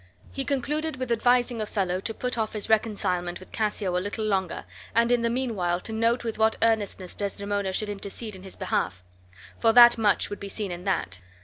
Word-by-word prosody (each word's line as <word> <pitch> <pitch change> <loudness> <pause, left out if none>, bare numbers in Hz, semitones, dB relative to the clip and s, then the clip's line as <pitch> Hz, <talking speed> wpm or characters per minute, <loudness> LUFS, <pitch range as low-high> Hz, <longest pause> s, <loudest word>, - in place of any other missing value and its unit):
He 270 - -4
concluded 295 +3 -1
with 255 -2 -4
advising 245 0 +2
Othello 190 -4 -1
to 225 +4 -3
put 250 0 -2
off 220 -2 -2
his 210 -2 -3
reconcilement 180 -5 0
with 185 - -14
Cassio 210 -4 -1
a 180 - +1
little 205 +3 -3
longer, 190 -4 -1 0.3
and 235 +1 +4
in 245 -1 +3
the 235 - +1
mean 245 -1 -1
while 175 -2 0
to 220 - -6
note 230 +2 +1
with 225 -2 -4
what 220 0 +3
earnestness 205 -5 0
Desdemona 200 -1 -2
should 215 +3 -1
intercede 205 +1 -6
in 185 - -11
his 190 0 -9
behalf; 90 0 -2 0.6
for 225 -1 +4
that 240 -1 +8
much 205 -2 +2
would 205 - -5
be 200 - -6
seen 200 -1 -3
in 175 +1 -7
that. 165 - -1
215 Hz, 205 wpm, -26 LUFS, 190-235 Hz, 0.6 s, that